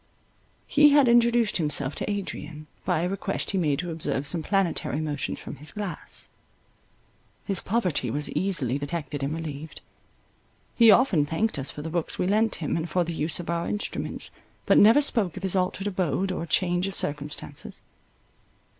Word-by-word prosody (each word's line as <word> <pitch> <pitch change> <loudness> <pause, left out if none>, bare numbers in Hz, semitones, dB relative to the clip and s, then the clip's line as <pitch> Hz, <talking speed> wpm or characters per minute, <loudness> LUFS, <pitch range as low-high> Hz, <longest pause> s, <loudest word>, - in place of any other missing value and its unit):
He 295 0 +6
had 285 -2 +5
introduced 235 -2 +4
himself 150 -4 0
to - - -3
Adrian, 160 -6 -5 0.2
by 160 - +1
a 175 - 0
request 195 +1 -2
he 195 - 0
made 150 -5 +1
to 175 +3 -3
observe 155 -3 -2
some 160 +3 0
planetary 170 - 0
motions 150 -3 -3
from - - -8
his 150 +4 -6
glass. 200 -6 -6 1.2
His 195 -3 +1
poverty 180 - 0
was 145 +6 -1
easily 150 -7 0
detected 145 -1 -4
and 140 +1 -1
relieved. 155 -1 -7 0.9
He 230 -1 +6
often 210 - +5
thanked 160 +5 -1
us 135 - -4
for 150 - -7
the 160 - -5
books 170 -1 -2
we - - 0
lent 215 +3 +2
him, 150 - -2
and 165 +1 -3
for 180 +2 +1
the 170 0 -4
use 160 +2 +1
of 175 - -6
our 170 0 -1
instruments, 205 - -3 0.3
but - - +5
never 230 +8 +7
spoke 205 - +1
of 190 - -7
his 190 0 +1
altered 185 +1 0
abode 185 -2 0
or 170 -2 -4
change 180 +1 +1
of 195 - -3
circumstances. 150 0 -4
175 Hz, 170 wpm, -26 LUFS, 150-200 Hz, 1.2 s, never